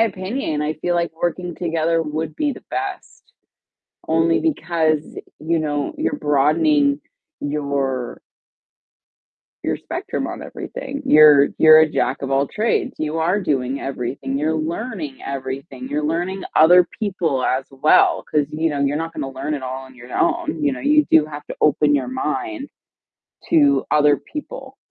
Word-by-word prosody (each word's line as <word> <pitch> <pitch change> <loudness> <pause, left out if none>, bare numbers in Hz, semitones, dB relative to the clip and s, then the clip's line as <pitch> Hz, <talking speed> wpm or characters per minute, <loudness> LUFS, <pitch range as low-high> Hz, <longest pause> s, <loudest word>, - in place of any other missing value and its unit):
opinion, 195 - -1
I 155 +1 -1
feel 175 +3 -2
like 170 0 0
working 175 0 -2
together 165 -1 0
would 155 0 -4
be 295 -2 0
the - - -12
best, 390 -1 -6 0.8
only 165 +1 +2
because, 165 - +1 0.4
you 165 +2 0
know, 150 - -2
you're 305 -2 -1
broadening 145 0 +2 0.4
your 140 -4 -2 1.4
your - - -1
spectrum - - -4
on - - -6
everything. - - -7
You're 150 -2 +7
you're 155 0 +8
a 160 0 +5
jack 135 - 0
of 135 - -4
all 135 +1 +2
trades, 215 +10 -1
you 155 +1 -2
are 175 +6 +1
doing 140 -6 -1
everything, 135 +1 -4
you're 155 +2 0
learning 165 - -4
everything, 135 0 -6
you're 150 +2 -2
learning 175 +5 -2
other 175 +3 +6
people 175 - -1
as 130 +1 0
well, 135 +3 +3
'cause, 150 -1 +2
you 160 +2 0
know, 145 -2 -3
you're 140 +1 +1
not 165 +1 -5
gonna 135 - -4
learn 135 +3 -4
it 140 - -5
all 130 +1 -5
on 130 - -15
your 120 0 -13
own. 340 -2 0
You 290 -2 +2
know, - - -5
you 300 +1 +3
do 160 -1 +6
have 150 -1 -9
to - - -7
open 150 0 +3
your 130 -3 0
mind 280 - -3 0.8
to 290 -4 +3
other 150 -2 +4
people 270 - -9
155 Hz, 155 wpm, -20 LUFS, 140-180 Hz, 1.4 s, you're